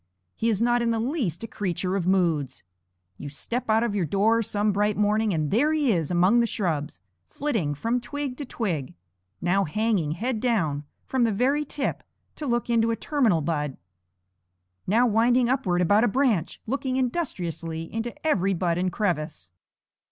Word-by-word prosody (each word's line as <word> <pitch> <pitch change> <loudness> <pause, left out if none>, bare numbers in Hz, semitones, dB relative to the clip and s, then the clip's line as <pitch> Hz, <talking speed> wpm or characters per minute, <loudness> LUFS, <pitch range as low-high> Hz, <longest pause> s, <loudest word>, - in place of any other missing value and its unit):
He 230 - 0
is 220 0 +1
not 240 0 +3
in 235 - +1
the 230 - +1
least 230 - -2
a - - -4
creature 185 -2 -2
of 185 -3 -1
moods. 165 -8 +1 0.6
You 145 - -6
step 230 - -4
out 220 +1 +4
of 235 -3 -1
your 200 -3 0
door 215 +7 +3
some 210 -1 0
bright 205 +1 +1
morning, 210 +1 +2
and 155 -4 -1
there 285 +9 +3
he 295 -5 +2
is 165 -7 0
among 185 +6 +4
the 235 - +3
shrubs, 155 - -2 0.3
flitting 215 - -2
from 230 - -1
twig 285 -1 -4
to 290 - -5
twig; 175 - -3 0.5
now 190 +3 +2
hanging 195 -3 0
head 230 +6 -2
down 165 - 0 0.2
from 260 -2 0
the 230 - +3
very 265 +8 +1
tip 285 0 -3 0.4
to 300 - -4
look 240 -1 0
into 230 -1 +2
a 230 - +1
terminal 230 - +1
bud; 150 -3 -2 1.1
now 225 +6 +4
winding 240 +2 +3
upward 185 -9 +1
about 205 +6 +4
a - - +4
branch, 225 - +1
looking 260 +2 -2
industriously 175 - -2
into 225 +2 -2
every 195 - +2
bud 170 -1 0
and 185 0 0
crevice. 155 - -2
210 Hz, 175 wpm, -25 LUFS, 175-240 Hz, 1.1 s, out